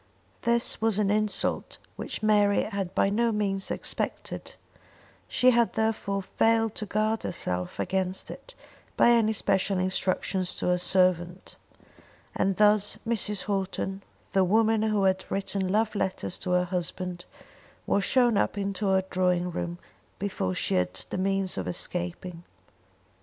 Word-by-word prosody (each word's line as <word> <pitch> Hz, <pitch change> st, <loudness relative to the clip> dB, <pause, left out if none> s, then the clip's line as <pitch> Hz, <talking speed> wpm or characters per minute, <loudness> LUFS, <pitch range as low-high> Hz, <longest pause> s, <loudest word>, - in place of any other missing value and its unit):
This 235 Hz, -1 st, +1 dB
was 220 Hz, -2 st, +2 dB
an 205 Hz, -2 st, +2 dB
insult 215 Hz, 0 st, 0 dB, 0.2 s
which -, -, -6 dB
Mary 205 Hz, -1 st, +3 dB
had 200 Hz, -4 st, -4 dB
by 195 Hz, -, +2 dB
no 230 Hz, +3 st, +2 dB
means 195 Hz, -2 st, -1 dB
expected; -, -, -3 dB, 0.7 s
she 255 Hz, 0 st, +4 dB
had 235 Hz, -1 st, +2 dB
therefore 215 Hz, -3 st, -1 dB
failed 225 Hz, +2 st, +1 dB
to 215 Hz, -, -5 dB
guard 215 Hz, +2 st, 0 dB
herself 90 Hz, -, -3 dB
against 190 Hz, 0 st, -1 dB
it -, -, -11 dB, 0.4 s
by 240 Hz, -, +6 dB
any 230 Hz, -2 st, +4 dB
special 195 Hz, -2 st, +1 dB
instructions 185 Hz, 0 st, -1 dB
to -, -, -3 dB
her 180 Hz, 0 st, +2 dB
servant. 180 Hz, -1 st, +1 dB, 0.8 s
And 195 Hz, 0 st, 0 dB
thus 210 Hz, 0 st, +4 dB
Mrs. 210 Hz, -3 st, 0 dB
Houghton, 195 Hz, -1 st, -2 dB, 0.3 s
the 190 Hz, -1 st, +3 dB
woman 220 Hz, +3 st, +3 dB
who 215 Hz, -2 st, +1 dB
had 190 Hz, 0 st, +2 dB
written 195 Hz, -1 st, -2 dB
love 215 Hz, +3 st, +1 dB
letters 190 Hz, -3 st, -2 dB
to -, -, -4 dB
her 180 Hz, 0 st, +3 dB
husband, 180 Hz, 0 st, -4 dB, 0.6 s
was 200 Hz, -, +1 dB
shown 240 Hz, +1 st, +3 dB
up 205 Hz, -, 0 dB
into 200 Hz, 0 st, -2 dB
her 190 Hz, 0 st, +3 dB
drawing 180 Hz, -1 st, +1 dB
room 175 Hz, 0 st, -4 dB, 0.4 s
before 140 Hz, -, -2 dB
she -, -, -1 dB
had 90 Hz, 0 st, 0 dB, 0.2 s
the -, -, -2 dB
means 195 Hz, 0 st, 0 dB
of -, -, -4 dB
escaping. 175 Hz, 0 st, -3 dB
195 Hz, 140 wpm, -27 LUFS, 185-215 Hz, 0.8 s, by